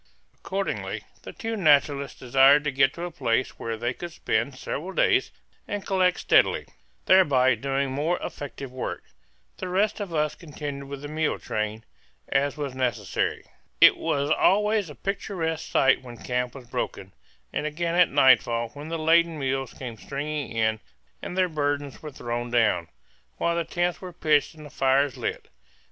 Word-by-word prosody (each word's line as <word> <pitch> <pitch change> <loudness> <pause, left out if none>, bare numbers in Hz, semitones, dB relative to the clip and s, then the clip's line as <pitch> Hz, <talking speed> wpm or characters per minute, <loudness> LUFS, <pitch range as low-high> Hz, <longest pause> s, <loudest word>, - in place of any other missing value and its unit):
Accordingly, 195 +1 -4 0.2
the - - -8
two 225 -1 -4
naturalists 145 - +2
desired 135 +3 +5
to 150 - 0
get 135 0 +3
to 170 - -6
a 175 - -4
place 125 -5 -1
where 115 -1 -3
they 120 +2 -1
could 175 +6 -7
spend 125 -4 -1
several 165 +7 -5
days - - +3 0.4
and 205 -1 -4
collect 185 -2 +2
steadily, - - +3 0.4
thereby 135 -9 +5
doing 135 +3 -1
more 150 +6 0
effective 140 -2 -7
work. 130 -1 -5 0.5
The - - -5
rest 200 +4 +1
of 200 -4 -4
us 150 -2 0
continued 145 -4 -7
with 140 0 -7
the - - -4
mule 155 +1 -1
train, 110 +1 -3 0.4
as 140 +1 0
was 145 -3 -3
necessary. 120 -8 -1 0.4
It - - +8
was 140 +1 -1
always 210 +1 +3
a 150 - -10
picturesque 180 - -3
sight 135 -1 +4
when 120 -2 -10
camp 125 +1 -2
was 130 -3 -10
broken, - - -4 0.4
and 150 - -1
again 165 +2 -2
at 175 0 +5
nightfall 120 -4 +4
when 145 +5 -9
the 165 - -2
laden 165 +1 +3
mules 135 -2 -2
came 120 -4 -7
stringing 145 +4 -4
in 110 -1 +1 0.4
and 180 - -6
their 185 -1 +4
burdens 145 -3 -2
were 155 - -6
thrown 120 -2 -4
down, 110 -8 +2 0.5
while 170 0 0
the 170 - 0
tents 175 +1 -1
were 185 -1 -7
pitched 155 0 +2
and 155 -1 -12
the 145 - -11
fires 135 -1 +2
lit. - - -4
145 Hz, 165 wpm, -26 LUFS, 130-170 Hz, 0.5 s, It